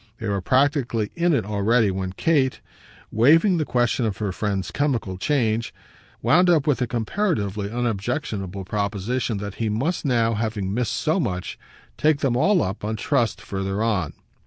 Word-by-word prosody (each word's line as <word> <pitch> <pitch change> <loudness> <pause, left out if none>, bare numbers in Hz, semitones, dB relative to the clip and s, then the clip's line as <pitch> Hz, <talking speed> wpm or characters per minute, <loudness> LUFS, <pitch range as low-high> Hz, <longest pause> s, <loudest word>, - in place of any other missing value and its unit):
They 110 - -5
were 100 -1 -1
practically 130 - +1
in 175 +1 +2
it 120 -10 +1
already 105 +1 +2
when 95 0 -4
Kate, 135 +2 +1 0.5
waiving 165 - +4
the 155 - 0
question 120 -1 +1
of 110 -3 -1
her 105 -3 -2
friend's 95 -2 -2
chemical 125 -9 -1
change, 115 -4 0 0.5
wound 180 +3 +4
up 160 -5 +4
with 145 -5 +2
the 125 - 0
comparatively 110 - -1
unobjectionable 110 - -3
proposition 105 +4 -2
that 100 0 -5
he 110 - +1
must 135 +12 -1
now, 115 -5 +2
having 105 -3 -2
missed 120 -1 -1
so 160 +4 +1
much, 90 - -3 0.4
take 155 -1 +2
them 130 -4 +1
all 185 +8 +3
up, 95 +3 -4
on 110 +1 -2
trust, 120 0 0
further 95 +2 -3
on. 100 -9 0
115 Hz, 160 wpm, -23 LUFS, 100-140 Hz, 0.5 s, waiving